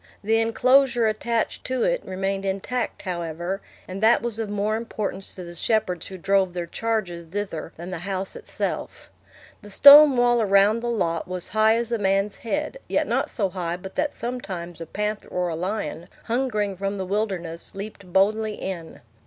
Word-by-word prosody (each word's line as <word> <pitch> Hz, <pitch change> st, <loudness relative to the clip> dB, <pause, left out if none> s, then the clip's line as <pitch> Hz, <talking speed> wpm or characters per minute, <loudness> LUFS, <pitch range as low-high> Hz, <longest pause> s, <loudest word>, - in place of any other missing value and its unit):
The 225 Hz, +2 st, +3 dB
enclosure 245 Hz, +1 st, +3 dB
attached 225 Hz, +1 st, -1 dB
to 255 Hz, -1 st, 0 dB
it -, -, +1 dB
remained 195 Hz, +1 st, -2 dB
intact, 195 Hz, +6 st, -2 dB
however, 175 Hz, +1 st, -3 dB, 0.3 s
and 190 Hz, +2 st, -6 dB
that 225 Hz, +1 st, +5 dB
was 230 Hz, -2 st, -3 dB
of 220 Hz, -2 st, -2 dB
more 205 Hz, +1 st, 0 dB
importance 215 Hz, -4 st, -4 dB
to 185 Hz, -, -7 dB
the 175 Hz, 0 st, -9 dB
shepherds 180 Hz, -1 st, 0 dB
who 190 Hz, -, -8 dB
drove 190 Hz, 0 st, +2 dB
their 175 Hz, -1 st, -3 dB
charges 185 Hz, -3 st, -2 dB
thither 170 Hz, -3 st, -4 dB
than 175 Hz, +3 st, -7 dB
the 180 Hz, -, -4 dB
house 190 Hz, +1 st, -4 dB
itself. -, -, -5 dB, 0.5 s
The 205 Hz, -, -12 dB
stone 285 Hz, +5 st, +9 dB
wall 240 Hz, -1 st, +4 dB
around 200 Hz, +2 st, +4 dB
the 240 Hz, +1 st, -3 dB
lot 170 Hz, -8 st, -1 dB
was 180 Hz, -1 st, -4 dB
high 215 Hz, +2 st, +4 dB
as 235 Hz, 0 st, -2 dB
a 235 Hz, -, 0 dB
man's 195 Hz, +1 st, +1 dB
head, 295 Hz, -, -3 dB
yet -, -, +1 dB
not -, -, 0 dB
so 200 Hz, -6 st, -1 dB
high 175 Hz, -2 st, -3 dB
but 190 Hz, +1 st, -9 dB
that 295 Hz, -1 st, -1 dB
sometimes 185 Hz, -9 st, -5 dB
a 165 Hz, -, -6 dB
panther 210 Hz, +4 st, -3 dB
or 180 Hz, -1 st, -1 dB
a 165 Hz, -, -3 dB
lion, 175 Hz, -2 st, -3 dB, 0.2 s
hungering 225 Hz, -5 st, -1 dB
from 195 Hz, +1 st, -2 dB
the 190 Hz, -, -3 dB
wilderness, 185 Hz, -5 st, -3 dB
leaped 200 Hz, -2 st, -8 dB
boldly 210 Hz, +3 st, +2 dB
in. 170 Hz, -4 st, -6 dB
200 Hz, 180 wpm, -24 LUFS, 180-225 Hz, 0.5 s, stone